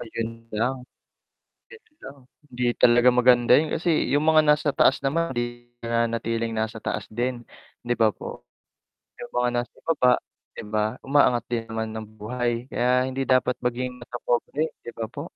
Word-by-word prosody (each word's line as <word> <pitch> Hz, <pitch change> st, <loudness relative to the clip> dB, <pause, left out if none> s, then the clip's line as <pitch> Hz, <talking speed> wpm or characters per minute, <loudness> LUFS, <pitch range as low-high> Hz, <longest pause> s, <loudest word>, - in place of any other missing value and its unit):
Ayun 115 Hz, 0 st, -6 dB
lang, 125 Hz, +5 st, 0 dB, 0.9 s
'yun 465 Hz, -1 st, -15 dB, 0.2 s
lang. 140 Hz, -, -10 dB, 0.3 s
Hindi 125 Hz, 0 st, -3 dB, 0.2 s
talaga 120 Hz, +1 st, +6 dB
maganda 125 Hz, -1 st, +5 dB
'yun 155 Hz, +4 st, +4 dB
kasi 165 Hz, -1 st, 0 dB
'yung 145 Hz, +3 st, +2 dB
mga 160 Hz, 0 st, +6 dB
nasa 150 Hz, -1 st, +2 dB
taas 135 Hz, -, +4 dB
naman 165 Hz, +5 st, 0 dB
hindi 120 Hz, -1 st, -5 dB, 0.2 s
nanatiling 115 Hz, 0 st, -1 dB
nasa 110 Hz, 0 st, -3 dB
taas -, -, -3 dB
din, 120 Hz, +1 st, -2 dB, 0.4 s
'di 120 Hz, -, +1 dB
ba 110 Hz, -2 st, +3 dB
po? -, -, -8 dB, 0.8 s
'Yung -, -, -9 dB
mga 125 Hz, 0 st, +2 dB
nasa 120 Hz, -, -8 dB
ibaba, 135 Hz, -6 st, +3 dB, 0.4 s
'di -, -, -6 dB
ba, 110 Hz, +2 st, 0 dB
umaangat 135 Hz, -4 st, +3 dB
din 115 Hz, -1 st, 0 dB
naman 110 Hz, 0 st, -4 dB
ang 110 Hz, -1 st, -7 dB
buhay, 120 Hz, +2 st, -3 dB
kaya 125 Hz, +1 st, +2 dB
hindi 130 Hz, 0 st, -3 dB
dapat 130 Hz, -1 st, +3 dB
maging 125 Hz, +1 st, -3 dB
matapobre, 125 Hz, +5 st, -2 dB
'di 120 Hz, -, -8 dB
ba 115 Hz, -, -3 dB
po? -, -, -6 dB
120 Hz, 160 wpm, -24 LUFS, 115-130 Hz, 0.9 s, talaga